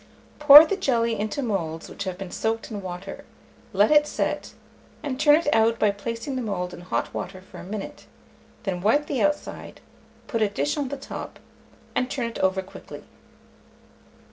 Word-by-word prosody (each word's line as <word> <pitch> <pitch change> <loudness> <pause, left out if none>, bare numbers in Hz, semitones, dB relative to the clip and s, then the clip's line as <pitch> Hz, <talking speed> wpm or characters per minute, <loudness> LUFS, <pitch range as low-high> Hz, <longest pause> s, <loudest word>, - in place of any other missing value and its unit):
Pour 295 +1 +11
the 395 - -1
jelly 235 - +1
into 215 +7 -2
moulds 165 -8 -3
which 200 - -7
have 185 -1 -4
been 190 -2 -7
soaked 225 +1 -2
in 205 -2 -5
water; 185 +1 -7 0.5
let 205 +3 +3
it 295 0 +5
set, - - -3 0.5
and 275 -3 -4
turn 295 0 +6
it 325 0 -1
out 225 +1 +3
by 210 -2 +3
placing 230 +6 -5
the 255 - -2
mould 180 -5 -3
in - - -9
hot 180 - -3
water 185 0 -5
for 185 - -13
a - - -9
minute; 200 +2 -7 0.6
then 185 -4 -3
wipe 255 +10 +3
the 275 - -2
outside, 295 0 -2 0.5
put 230 - -2
a 215 - +3
dish 145 -7 -1
on 285 -2 -2
the 280 +2 -5
top, 275 - -8 0.6
and 250 - 0
turn 260 -3 -2
it 230 - -5
over 190 0 +1
quickly. 190 - -11
225 Hz, 180 wpm, -24 LUFS, 190-275 Hz, 0.6 s, Pour